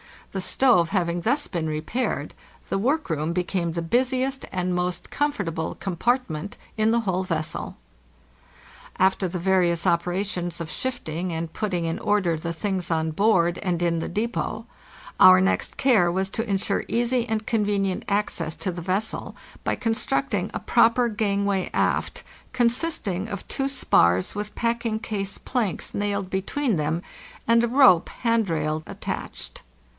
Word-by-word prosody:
The 190 - -3
stove 185 -6 +4
having 175 -3 0
thus 280 - +1
been 170 -4 -2
repaired, 155 +12 -2 0.4
the - - 0
workroom 190 - 0
became 175 -1 -1
the 170 - -2
busiest 255 +7 0
and 180 -1 -1
most 180 0 -2
comfortable 200 - -1
compartment 195 -1 -1 0.2
in 215 0 +3
the 235 0 +2
whole 190 -3 -1
vessel. 160 -4 -3 1.2
After 190 0 +2
the 180 +1 -4
various 175 -2 +2
operations 175 0 0
of 155 -2 -5
shifting 185 -9 -3
and 165 0 -3
putting 180 -4 -2
in 165 0 -2
order 205 -6 +1
the 170 +2 -4
things 185 +1 -2
on 160 -1 0
board 175 -2 +3
and 175 -2 -1
in 170 -1 +1
the - - -3
depot, 220 +2 -2 0.5
our 185 0 +9
next 190 - 0
care 225 -10 +4
was 190 +2 -1
to 225 +2 -3
insure 195 0 0
easy 240 +1 +1
and 220 -1 -2
convenient 205 -4 0
access 200 -6 -1
to 185 - -3
the 175 0 -6
vessel 190 +5 -2 0.3
by - - +1
constructing 200 - 0
a - - -2
proper 235 +1 +3
cangway 200 -3 0
aft, - - 0 0.3
consisting 235 - 0
of 200 -4 -6
two 270 - -1
spars 95 - +3
with 210 0 -5
packing 235 -1 0
case 205 -4 -3
planks 235 -8 -2
nailed 200 -2 -1
between 200 +4 0
them 155 +3 -1 0.4
and 230 0 +5
a - - +2
rope 240 -9 +6
hand 230 -4 0
rail 155 -1 -1
attached. - - -6
195 Hz, 145 wpm, -24 LUFS, 170-225 Hz, 1.2 s, our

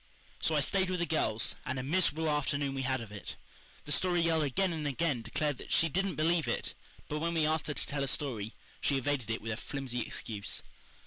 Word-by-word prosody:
'" - - -28
So - - +2
I - - +4
stayed 190 -1 +2
with 185 -1 0
the 170 - +2
girls, 135 -9 +1
and 130 - -2
a 130 - -2
miserable 160 +1 +2
afternoon 145 -2 +1
we 135 - -2
had 130 -1 0
of 110 -3 -8
it. 105 - -5 0.5
The 145 - -5
Story 175 +3 +3
Girl 165 -1 +3
again 170 +6 +1
and 155 -2 -2
again 145 -2 0
declared 145 +4 -1
that - - -8
she 165 - +4
"didn't 195 +4 0
believe 160 -2 +2
it," 120 - -1 0.3
but 150 - -2
when 170 +2 0
we 160 -2 +3
asked 155 0 +1
her 150 - -2
to - - 0
tell 140 -1 -1
a - - 0
story, 120 -6 -1 0.3
she 140 - +3
evaded 135 -3 0
it 115 - -2
with 115 - -2
a 110 - -2
flimsy 130 -2 -3
excuse. 105 -3 -2
145 Hz, 235 wpm, -32 LUFS, 130-165 Hz, 0.5 s, I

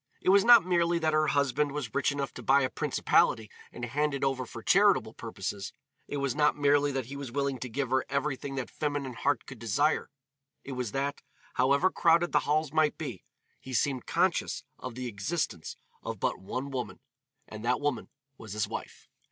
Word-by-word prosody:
It - - 0
was 195 +1 +6
not 235 -4 +8
merely 170 -1 +2
that 160 -2 +1
her 155 0 +3
husband 140 0 +1
was 140 -7 -4
rich 140 - +2
enough 140 -1 -3
to - - -8
buy 140 +1 +4
a 130 - -1
principality 110 -2 +2 0.2
and 120 - -5
hand 145 +4 0
it 140 - -4
over 130 -2 0
for 115 -1 -9
charitable 200 - +4
purposes, 100 -3 -5 0.3
it 145 - -4
was 140 -3 0
not 150 +1 +2
merely 145 0 +3
that 135 -3 -2
he 135 +4 -8
was 140 -3 -6
willing 140 -1 -1
to 130 - -5
give 130 +2 -2
her 130 0 +3
everything 140 0 -2
that 130 -2 -4
feminine 145 -3 -2
heart 145 +5 0
could 130 -4 -10
desire, 145 +8 +1 0.5
it 140 - -8
was 125 -4 -3
that, 140 +1 -2 0.3
however 140 +8 +3
crowded 170 0 +3
the - - +4
halls 155 -1 +1
might 155 -1 +2
be, 125 - -6 0.4
he 130 -1 -6
seemed 130 +1 0
conscious - - +1 0.2
of 130 -2 -7
the 130 0 -5
existence 105 - -3 0.3
of - - -5
but - - -1
one 130 +8 -5
woman, 130 -2 -4 0.5
and 110 0 -9
that 125 +1 +1
woman 145 -5 -2 0.3
was 110 -3 -8
his 105 -1 -1
wife. - - -7
140 Hz, 195 wpm, -29 LUFS, 125-150 Hz, 0.5 s, not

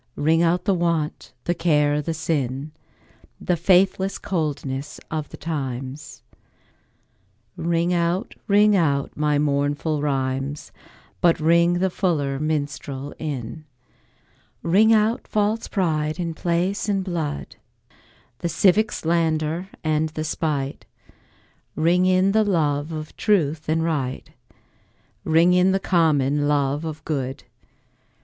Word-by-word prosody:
Ring 160 +3 +2
out 170 +1 +1
the 200 - +3
want, 170 -4 -1
the 175 - 0
care 150 -3 +2
the 160 +2 -3
sin, 145 -3 -2 0.7
The 180 - 0
faithless 190 +2 +2
coldness 145 -7 -3
of 155 -2 -3
the - - -10
times; 135 -2 -5 1.3
Ring 170 +1 0
out, 175 +5 0
ring 210 0 +5
out 145 -6 +1
my 150 -1 +1
mournful 145 +1 0
rhymes, 135 - -2 0.5
But 170 -1 +4
ring 170 +2 +4
the 185 +1 0
fuller 145 -8 0
minstrel 145 -2 -3
in. 150 0 -5 1.0
Ring 205 +7 +4
out 220 +1 +2
false 215 +2 0
pride 155 -4 -1
in 170 -2 -2
place 175 +6 -1
and 195 -2 +1
blood, 165 -6 -4 0.8
The 170 - -2
civic 210 +4 +3
slander 165 +1 0
and 155 0 +1
the 155 0 -4
spite; 145 -3 -2 0.9
Ring 175 +3 +3
in 185 +1 +3
the 220 +1 +3
love 155 -6 0
of 155 -1 -6
truth 160 -8 +1
and 160 +1 +1
right, 140 -6 -2 0.9
Ring 165 +3 +4
in 180 +1 +4
the 195 - +1
common 150 -6 +2
love 145 +1 0
of 155 -1 -6
good. 135 -3 -3
160 Hz, 120 wpm, -23 LUFS, 145-175 Hz, 1.3 s, ring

